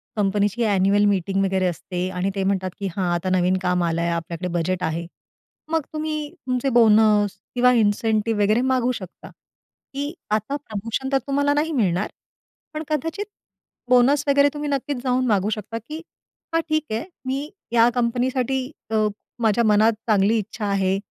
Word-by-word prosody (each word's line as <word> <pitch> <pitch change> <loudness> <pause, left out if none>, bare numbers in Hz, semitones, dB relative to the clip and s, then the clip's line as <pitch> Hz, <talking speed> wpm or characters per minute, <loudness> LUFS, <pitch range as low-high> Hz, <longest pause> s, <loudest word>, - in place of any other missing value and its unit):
कंपनीची 205 +2 +1
annual 200 0 +3
meeting 195 0 +1
वगैरे 190 -1 +1
असते 180 +1 -3
आणि 185 +1 -1
ते 195 - -1
म्हणतात, 190 -1 0
की 200 - -2
"हां, 180 -3 0
आता 175 +2 -1
नवीन 180 +1 +2
काम 180 -1 +1
आलंय, 170 0 0
आपल्याकडे 170 +1 -3
बजेट 180 +2 -1
आहे." 165 +1 -2 0.7
मग 325 -1 +2
तुम्ही 305 -1 -3 0.2
तुमचे 255 +1 0
बोनस 210 -3 +4 0.2
किंवा 250 0 +5
इन्सेंटिव्ह 220 0 +1
वगैरे 215 +4 +3
मागू 255 -1 +2
शकता. 190 -7 -8 0.6
की 285 +3 -3 0.2
आता 215 +6 0
प्रमोशन 230 0 -4
तर 270 - +4
तुम्हाला 285 +1 +2
नाही 300 +3 0
मिळणार. 205 - +1 0.6
पण 310 - -4
कदाचित 325 +7 -2 0.6
बोनस 255 +3 +4
वगैरे 280 0 +5
तुम्ही 295 0 -4
नक्कीच 280 0 -2
जाऊन 255 0 +1
मागू 205 -2 +2
शकता, 220 +1 -4
की 305 +8 -8 0.5
हां 330 - +3
ठीक 310 0 +1
आहे. 220 +5 -2 0.2
मी 275 +3 -2 0.2
या 235 0 +5
कंपनीसाठी 250 +2 0 0.3
अ, 215 -1 +2 0.3
माझ्या 225 +1 +3
मनात 215 +1 +4
चांगली 210 +1 +3
इच्छा 215 +1 -4
आहे. 195 -1 +1
220 Hz, 155 wpm, -23 LUFS, 195-260 Hz, 0.7 s, किंवा